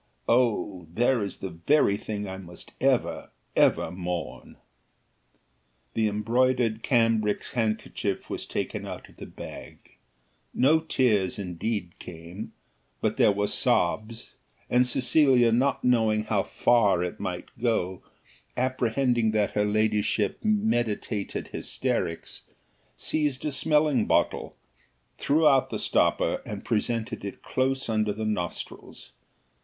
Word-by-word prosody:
Oh! 105 -7 +1
there 120 +4 +2
is 100 - -5
the 95 - -6
very 100 - +2
thing 105 0 -5
I 95 0 -6
must 90 -2 -9
ever, - - +1 0.3
ever - - +3
mourn." 90 -2 -5 1.4
The 110 -1 +1
embroidered 115 +2 +1
cambric 115 -5 +2
handkerchief 110 -3 -2
was - - -5
taken - - -3
out - - -8
of - - -20
the - - -9
bag; - - -10 0.8
no 150 +5 +4
tears, 115 - +1
indeed, 90 0 -4
came, 85 +4 -9 0.5
but - - -1
there - - +5
were 100 +1 0
sobs, 110 +2 0 0.4
and 125 +1 +4
Cecilia 125 -1 +4
not 130 +5 +1
knowing 110 -3 +3
how 105 -2 +1
far 100 -5 +2
it 90 - -5
might 90 -1 -4
go, 95 -6 0 0.6
apprehending 125 -2 +1
that 105 -2 +1
her 105 0 +1
ladyship 105 0 +1
meditated 120 - -1
hysterics, 85 0 -3 0.6
seized 150 - -1
a 150 - 0
smelling 150 -3 +2
bottle, - - +1 0.6
threw 155 +2 +3
out 135 -3 +4
the - - -3
stopper, - - +1
and - - -7
presented 115 0 -1
it 100 - -7
close 130 +1 -1
under 110 -2 +1
the 110 +1 -4
nostrils. 105 -5 -5
110 Hz, 120 wpm, -27 LUFS, 100-125 Hz, 1.4 s, there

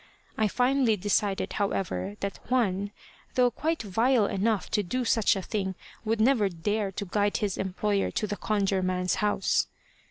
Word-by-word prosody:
I 215 - +2
finally 250 0 +2
decided, 200 0 0
however, 200 0 -2
that 200 0 -3
Juan, 205 -6 +1 0.5
though 250 -1 +4
quite 315 +4 -1
vile 225 +3 +3
enough 200 +1 0
to 210 - +2
do 250 +7 -2
such 225 -2 +3
a 190 - -3
thing, 190 -3 -2 0.3
would 225 0 0
never 220 -3 +4
dare 200 +4 -1
to 200 - -4
guide 205 +2 +1
his 205 -3 -1
employer 195 +1 0
to - - -1
the 205 0 -3
Conjure 200 -3 0
man's 185 0 0
house. 210 -2 +2
205 Hz, 160 wpm, -28 LUFS, 195-225 Hz, 0.5 s, though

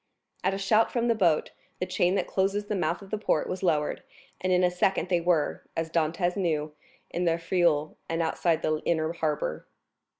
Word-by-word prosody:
At 190 +1 +1
a - - -3
shout 215 +3 +3
from 240 -1 0
the - - +5
boat, 175 -8 +2 0.3
the 185 - 0
chain 185 0 +1
that - - +1
closes 200 +2 0
the 210 - -2
mouth 170 +1 -1
of 195 - -14
the 215 - -1
port 160 -7 +1
was 185 - -4
lowered 150 -5 +1 0.4
and 185 - -1
in 180 0 +4
a 180 - +3
second 180 +1 +1
they 175 -2 +2
were, 170 -3 +1 0.2
as 165 0 -2
Dantès 170 +2 +1
knew, 155 -6 -1 0.4
in 180 - -1
the 165 -1 +2
Frioul 165 -3 +1
and 165 0 -1
outside 165 0 +1
the 155 0 +1
inner 160 0 0
harbor. 150 - -2
175 Hz, 200 wpm, -27 LUFS, 160-190 Hz, 0.4 s, the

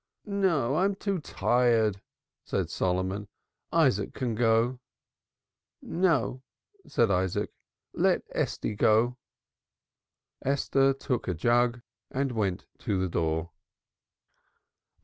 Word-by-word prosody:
"No, 170 - +1
I'm 195 +3 +2
too 195 -1 -2
tired," 115 -8 +2 0.4
said - - -2
Solomon. 95 +2 -1 0.4
"Isaac 130 - +2
can 125 -3 -1
go." 115 +2 +2 1.0
"No," 165 -8 0 0.5
said 115 -4 +2
Isaac. 95 -1 0 0.4
"Let - - +2
Estie - - -1
go." 115 +4 +3 1.2
Esther 135 0 +2
took 130 -2 -3
a 90 - 0
jug 120 +6 +2 0.3
and 135 0 -1
went 100 -5 -1
to 100 -6 -1
the 95 0 0
door. 80 0 -1
120 Hz, 95 wpm, -28 LUFS, 100-135 Hz, 1.2 s, go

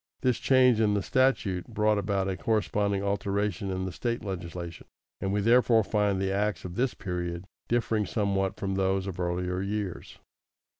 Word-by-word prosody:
This 125 -3 +1
change 125 -4 +4
in 105 -2 +3
the 100 - 0
statute 110 -9 +1
brought 105 -2 +1
about 100 -1 0
a 95 - -1
corresponding 100 -2 0
alteration 100 0 -1
in 95 0 -2
the 95 - -3
State 115 +5 -3
legislation, 85 -3 -6 0.3
and 95 - -1
we 100 +1 +1
therefore 115 0 +5
find 105 -2 +1
the 95 0 0
acts 100 -3 -1
of 90 - -6
this 125 +5 0
period 90 -2 -4 0.2
differing 115 -3 +1
somewhat 100 -2 0
from 100 -2 -3
those 95 0 +1
of 95 -2 -6
earlier 90 +1 -1
years. 100 -2 -4
100 Hz, 165 wpm, -28 LUFS, 95-105 Hz, 0.3 s, therefore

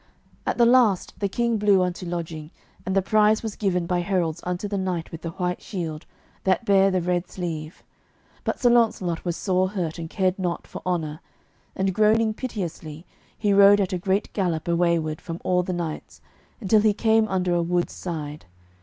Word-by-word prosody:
At - - 0
the 240 - +5
last 235 -6 +3
the 200 - 0
King 235 +1 0
blew 200 -3 +4
unto 180 0 -3
lodging, 165 -3 -5 0.4
and 190 - 0
the 195 - +3
prize 215 +2 +3
was 220 -2 -4
given 180 -4 0
by 180 +1 0
heralds 175 -3 -1
unto 180 +3 -3
the 200 -1 -2
knight 180 -3 -3
with 165 - -8
the 165 - -4
white 180 +1 -3
shield, 165 -5 -5 0.4
that 190 +5 +1
bare 195 -1 +5
the 185 -2 0
red 175 0 -1
sleeve. 160 -3 -6 0.6
But - - -2
Sir 245 - +4
Launcelot 215 -8 +2
was 175 -2 -2
sore 185 -1 +1
hurt, 175 -5 -3
and 165 -1 -6
cared 190 +1 0
not 175 -2 -2
for - - -9
honour; 160 -4 -2 0.6
and 190 0 0
groaning 215 +2 +3
piteously, 175 - -6 0.3
he 205 -2 +1
rode 200 +1 +7
at 195 -1 0
a 180 - -1
great 190 +3 -1
gallop 175 -6 -1
away 170 0 +2
ward 155 -1 -4
from 165 0 -6
all 180 0 +2
the 180 - -4
knights, 170 -3 -5 0.4
until 215 -1 +3
he 215 -1 +3
came 220 0 +3
under 185 -3 0
a 175 - +2
wood's 175 +1 0
side. 150 - -6
180 Hz, 190 wpm, -24 LUFS, 170-205 Hz, 0.6 s, rode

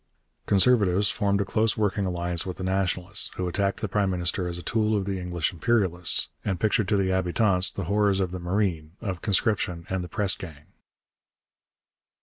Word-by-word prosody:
Conservatives 100 -2 +3
formed 100 -1 0
a - - -1
close 110 +2 +1
working 100 -2 0
alliance 85 -1 +2
with 90 -2 -6
the 95 - -6
Nationalists, 95 +1 -1
who 90 - -3
attacked 100 +2 -1
the 110 - -1
prime 100 0 0
minister 90 0 -1
as 85 0 -3
a 90 - -8
tool 110 -1 +1
of 100 - -2
the 95 -1 -3
English 90 -2 -2
imperialists, 90 -2 +1
and 95 -3 -2
pictured 110 -1 +1
to 105 - +2
the 95 -1 +1
habitants 95 +1 +2
the 100 - -5
horrors 100 +2 +1
of 95 -2 -1
the 90 - -5
marine, 90 -4 -2
of 95 -6 -5
conscription 100 -5 0
and 95 -1 -1
the - - -6
press 100 +2 +1
gang. 75 -5 -10
95 Hz, 180 wpm, -25 LUFS, 90-100 Hz, -, Conservatives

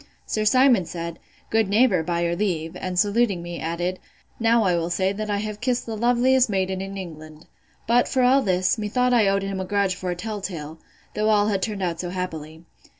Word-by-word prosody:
Sir 215 0 -1
Simon 250 -3 +4
said, 170 0 -6 0.3
Good 220 -2 +2
neighbour, 205 -4 +4
by 170 +1 -2
your 170 0 0
leave; 170 -5 -2
and 185 -1 -4
saluting 205 -2 +2
me, 175 -1 -6
added, 175 +3 -3 0.4
Now 230 0 +3
will 170 -3 +1
I - - -5
say, 190 +2 0
that 215 +1 -5
I 205 - 0
have 210 0 -5
kissed 250 -1 0
the 225 - -4
loveliest 245 +2 +3
maiden 190 -1 -1
in 195 0 -6
England. 155 -4 -9 0.4
But, 240 +2 +3
for 260 -2 +1
all 260 +2 +5
this, 185 0 +1
methought 250 +4 +1
I 225 -4 +4
owed 195 0 +1
him 195 -1 -3
a 190 - -3
grudge 200 -1 +1
for 180 0 -5
a 175 - -1
tell 210 +3 -5
tale, 160 -4 -6 0.3
though 215 +1 0
all 210 -1 +3
had 195 -2 0
turned 205 -1 -3
out 170 -2 -2
so 175 - -3
happily. 160 -3 -6
195 Hz, 210 wpm, -23 LUFS, 175-220 Hz, 0.4 s, all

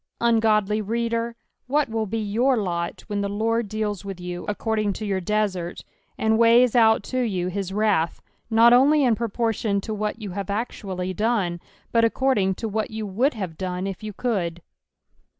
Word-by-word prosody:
Ungodly 215 -2 +2
reader, 230 +2 -1 0.3
what 290 +3 +2
will 220 -1 -2
be 225 +4 -2
your 230 +5 +1
lot 170 -4 -3
when 205 -2 -2
the 200 - -1
Lord 220 +1 -1
eals 210 -3 -2
with 195 -2 -6
you 180 0 -6
according 210 0 -1
to 215 - -5
your 195 -2 -1
desert, 185 -3 -2 0.3
and 220 0 +2
weighs 235 +1 +5
out 220 -3 +5
to 255 - -3
you 185 -7 -1
his 190 0 -3
wrath, 200 -5 +1 0.3
not 230 +1 +6
only 285 +4 +5
in 245 -3 +4
proportion 225 -2 -1
to 220 - -4
what 210 +1 -3
you 205 -4 -6
have 200 +1 -5
actually 195 -4 -3
dune, 205 -5 0 0.3
but 230 -1 +3
according 225 -5 +2
to 225 - -4
what 220 +1 -2
you 220 0 -5
would 240 +8 +1
have 185 -7 -5
done 185 0 -3
if 195 0 -5
you 215 0 -5
could. 185 -7 -2
215 Hz, 175 wpm, -24 LUFS, 195-230 Hz, 0.3 s, not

